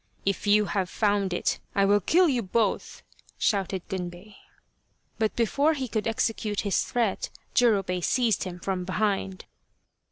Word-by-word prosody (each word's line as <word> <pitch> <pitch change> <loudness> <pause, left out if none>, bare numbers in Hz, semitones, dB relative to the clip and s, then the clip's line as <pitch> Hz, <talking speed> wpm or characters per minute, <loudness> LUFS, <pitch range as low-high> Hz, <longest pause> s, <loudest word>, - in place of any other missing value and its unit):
" - - -37
If 195 +1 -1
you 210 +1 +5
have 195 -3 -1
found 205 -3 +1
it 175 - -1 0.2
I 200 - +4
will 205 +1 +4
kill 350 - +4
you 255 -6 +1
both," 210 +1 -1 0.3
shouted 195 -3 0
Gunbei. 180 +1 -6 0.9
But 220 -1 0
before 280 +7 +2
he 265 -2 -3
could 215 -1 -2
execute 220 -2 -1
his 200 -2 +1
threat 230 -5 -1 0.2
Jurobei 195 -7 +2
seized 235 +1 +1
him 180 -1 -6
from 185 0 -2
behind. 195 0 -1
205 Hz, 150 wpm, -26 LUFS, 190-225 Hz, 0.9 s, you